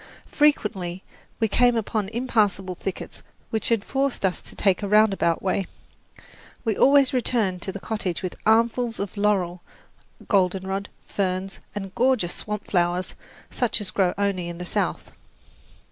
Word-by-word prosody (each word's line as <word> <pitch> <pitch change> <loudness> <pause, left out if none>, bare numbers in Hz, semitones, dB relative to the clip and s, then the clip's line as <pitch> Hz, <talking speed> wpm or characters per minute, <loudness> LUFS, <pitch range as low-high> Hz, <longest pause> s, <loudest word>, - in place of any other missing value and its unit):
Frequently 195 - +1 0.4
we 225 - +3
came 245 +3 +3
upon 215 -2 -1
impassable 210 -6 0
thickets 185 +1 -6 0.3
which 220 -2 -1 0.2
forced 270 -6 0
us 185 - 0
to - - -10
take 195 -1 +2
a 205 - -2
round 210 0 +5
about 170 -3 0
way. 190 0 0 1.0
We 220 -2 +1
always 275 +2 +5
returned 220 -7 +1
to 190 - -2
the 200 - -7
cottage 190 -5 -3
with 185 - -3
armfuls 230 +1 +2
of 200 +1 -4
laurel, 190 -4 +1 0.7
goldenrod, 190 0 +1 0.2
ferns 190 0 -2 0.2
and 195 -2 -5
gorgeous 245 -9 +2
swamp 210 -1 -5
flowers 175 0 0 0.4
such 245 -3 0
as 200 -3 -3
grow 185 -3 +1
only 195 -4 -1
in 170 - -6
the 180 - -6
South. - - -2
200 Hz, 145 wpm, -24 LUFS, 185-225 Hz, 1.0 s, round